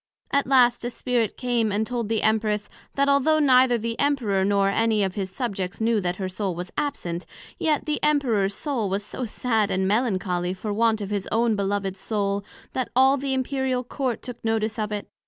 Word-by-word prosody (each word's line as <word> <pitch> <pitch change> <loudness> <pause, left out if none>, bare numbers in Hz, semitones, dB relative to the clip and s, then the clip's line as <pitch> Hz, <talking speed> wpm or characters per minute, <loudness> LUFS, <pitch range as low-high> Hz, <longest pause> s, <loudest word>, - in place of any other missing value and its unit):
At 280 -1 +2
last 250 -3 +4
a 240 - -1
Spirit 240 -3 -1
came 240 -4 0
and 210 +2 0
told 235 -2 -3
the 225 -1 0
Empress, 215 -1 +1 0.2
That 280 0 +2
although 280 +3 +4
neither 260 -4 +5
the 230 +1 -4
Emperor 240 -10 +1
nor 200 0 +2
any 220 0 +2
of 190 -1 -1
his 195 -2 -3
Subjects 195 -4 -4
knew 225 -1 +2
that 180 -1 -1
her 190 0 -3
Soul 185 -1 -3
was 180 +1 -6
absent; 185 - -3 0.3
yet 310 -2 +1
the 300 -1 -1
Emperor's 235 -10 +2
Soul 245 -8 -2
was 200 +2 -2
so 250 +4 -4
sad 220 -2 0
and 190 0 0
melancholy 185 -5 0
for 205 +2 -4
want 220 0 +2
of 200 0 -5
His 200 -2 -2
own 230 0 +2
beloved 200 -1 -1
Soul, 200 -1 -2 0.3
that 255 -3 -2
all 265 +2 +6
the 275 -1 -2
Imperial 260 -1 -1
Court 255 -1 -3
took 245 -2 -8
notice 225 0 0
of 210 0 -2
it. 210 -1 -4
220 Hz, 195 wpm, -24 LUFS, 200-255 Hz, 0.3 s, all